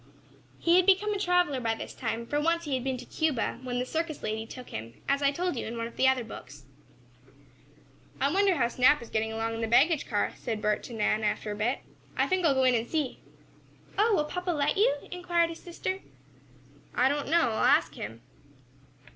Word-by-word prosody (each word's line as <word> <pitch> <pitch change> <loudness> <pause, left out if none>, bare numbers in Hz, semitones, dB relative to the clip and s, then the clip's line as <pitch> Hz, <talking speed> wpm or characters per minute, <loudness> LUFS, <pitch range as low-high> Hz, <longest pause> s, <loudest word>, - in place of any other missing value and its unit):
He 340 +1 +4
had 365 0 +4
become 405 +2 +4
a 405 - -2
traveler 355 -7 +2
by 225 -1 0
this - - -7
time, 230 -1 -3
for 290 +5 -1
once 335 +2 +1
he 295 -4 -3
had 255 -2 -1
been 260 -1 -1
to - - -9
Cuba, 290 -7 -1
when 250 -1 -3
the 250 - 0
circus 320 +2 -3
lady 220 +1 -3
took 250 +1 -10
him, 115 +1 -7
as 275 +1 +1
I 280 - +4
told 350 +3 -1
you 235 - -4
in 230 +1 -5
one 230 - -2
of 235 - -9
the 265 - +3
other 260 -2 +3
books. 225 - -10 1.6
"I 280 +3 +1
wonder 390 -1 +3
how 255 -6 +2
Snap 255 +5 +4
is 235 - -13
getting 220 0 0
along 225 +1 -2
in 225 - -4
the 225 - 0
baggage 285 +7 +4
car?" 205 -4 +1
said 225 -3 -3
Bert 210 0 0
to 240 - -9
Nan, 215 0 +1
after 210 0 -1
a - - -3
bit. 230 +6 -1 0.4
"I - - +3
think 370 -1 0
I'll 295 -5 +4
go 265 - +3
in 255 -1 +5
and 230 0 0
see." 300 -5 -1 0.8
"Oh, 425 +2 +3
will 300 - +1
papa 360 +4 -4
let 295 -3 +1
you?" 405 -6 +4 0.2
inquired 345 -1 +1
his 330 - -9
sister. 370 +2 -4 1.0
"I 255 - +4
don't 285 +1 -1
know. 320 -7 +3
I'll 220 - -1
ask - - +4
him." 115 +3 -8
270 Hz, 220 wpm, -28 LUFS, 230-335 Hz, 1.6 s, in